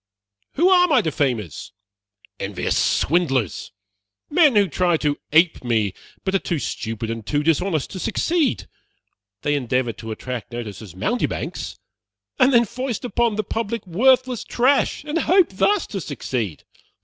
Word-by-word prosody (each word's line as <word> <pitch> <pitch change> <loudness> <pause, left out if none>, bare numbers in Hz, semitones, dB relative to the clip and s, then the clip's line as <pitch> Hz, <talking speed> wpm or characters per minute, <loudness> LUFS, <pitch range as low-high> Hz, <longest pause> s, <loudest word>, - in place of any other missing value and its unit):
Who 340 +5 +3
are 360 -1 +6
my 285 -8 +4
defamers? 125 - -2 0.7
Envious - - -2
swindlers! 135 - +1 0.6
Men 300 -5 +5
who 205 -1 +5
try 175 -2 +1
to 145 -1 -1
ape 160 0 +4
me, 110 -5 +1 0.3
but 190 - -1
are 195 - +3
too 175 - -2
stupid 115 -4 -4
and 115 -1 -5
too 145 +7 -1
dishonest 165 0 0
to 190 - -6
succeed. 320 - 0 0.8
They 145 - +1
endeavor 125 -3 0
to 110 - -9
attract 125 +2 -6
notice 115 -4 -6
as 95 -6 -11
mountebanks, 240 - -2 0.6
and 255 +1 +5
then 235 -2 +5
foist 255 +2 -4
upon 235 -2 +1
the 215 - -1
public 225 +2 -3
worthless 250 +6 +2
trash, 260 +4 +1
and 300 +2 -1
hope 365 +1 +4
thus 395 - +1
to 195 - -2
succeed. 120 - -4
175 Hz, 145 wpm, -22 LUFS, -, 0.8 s, are